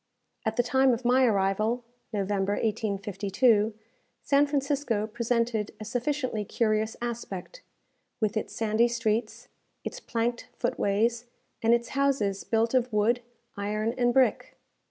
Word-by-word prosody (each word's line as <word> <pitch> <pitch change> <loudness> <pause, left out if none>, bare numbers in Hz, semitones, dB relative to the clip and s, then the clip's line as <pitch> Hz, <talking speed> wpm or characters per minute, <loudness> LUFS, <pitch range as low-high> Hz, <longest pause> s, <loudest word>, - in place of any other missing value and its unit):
At 220 - 0
the 245 - +3
time 265 +1 +3
of 240 +2 -10
my 255 +2 +5
arrival 215 +3 +1 0.3
(November, 200 -1 0
1852), 210 +1 +1 0.5
San 285 +1 +4
Francisco 280 -6 0
presented 230 -1 -1
a 215 - -6
sufficiently 245 -1 -1
curious 215 +1 0
aspect, 235 - -5 0.6
with 215 0 0
its 215 - -3
sandy 225 +1 +2
streets, 230 -1 -1 0.4
its - - -5
planked 235 - -2
foot - - -1
ways, 230 +4 +1 0.3
and 230 +1 +5
its 235 0 -3
houses 270 -9 0
built 230 +1 +1
of 255 -1 +2
wood, 225 +3 +2 0.3
iron, 215 +3 -1
and 245 -1 +2
brick. 260 +1 +2
230 Hz, 130 wpm, -28 LUFS, 210-245 Hz, 0.6 s, my